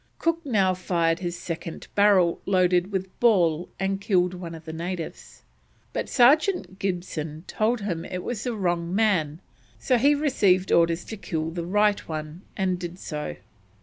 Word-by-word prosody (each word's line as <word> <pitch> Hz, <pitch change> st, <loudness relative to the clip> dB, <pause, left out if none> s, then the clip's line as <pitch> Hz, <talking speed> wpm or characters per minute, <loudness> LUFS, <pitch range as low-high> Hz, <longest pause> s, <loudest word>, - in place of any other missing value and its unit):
Cook 330 Hz, 0 st, 0 dB
now 200 Hz, -9 st, +2 dB
fired 170 Hz, -2 st, 0 dB
his 175 Hz, -1 st, -4 dB
second 165 Hz, -1 st, -6 dB
barrel 195 Hz, -4 st, +4 dB
loaded 185 Hz, 0 st, +2 dB
with 190 Hz, -1 st, -4 dB
ball 175 Hz, -8 st, +3 dB
and 195 Hz, +1 st, -1 dB
killed 180 Hz, -3 st, +2 dB
one 175 Hz, -2 st, -7 dB
of 160 Hz, 0 st, -12 dB
the 160 Hz, -, -6 dB
natives, 170 Hz, 0 st, -6 dB, 0.5 s
but -, -, -3 dB
Sergeant 280 Hz, -, +3 dB
Gibson 170 Hz, -5 st, -3 dB
told 225 Hz, +1 st, 0 dB
him 175 Hz, -5 st, -3 dB
it 180 Hz, 0 st, -5 dB
was 235 Hz, -3 st, -4 dB
the 245 Hz, -2 st, -2 dB
wrong 175 Hz, -3 st, -1 dB
man, 180 Hz, -8 st, +1 dB, 0.4 s
so 250 Hz, -3 st, +1 dB
he 285 Hz, +4 st, +5 dB
received 200 Hz, -11 st, +2 dB
orders 165 Hz, 0 st, +3 dB
to 220 Hz, -, -7 dB
kill 160 Hz, -4 st, -3 dB
the 170 Hz, 0 st, -4 dB
right 210 Hz, +2 st, +3 dB
one, 155 Hz, +1 st, -6 dB, 0.2 s
and 185 Hz, -2 st, 0 dB
did 175 Hz, 0 st, -6 dB
so. 150 Hz, -, -5 dB
185 Hz, 160 wpm, -25 LUFS, 170-205 Hz, 0.5 s, he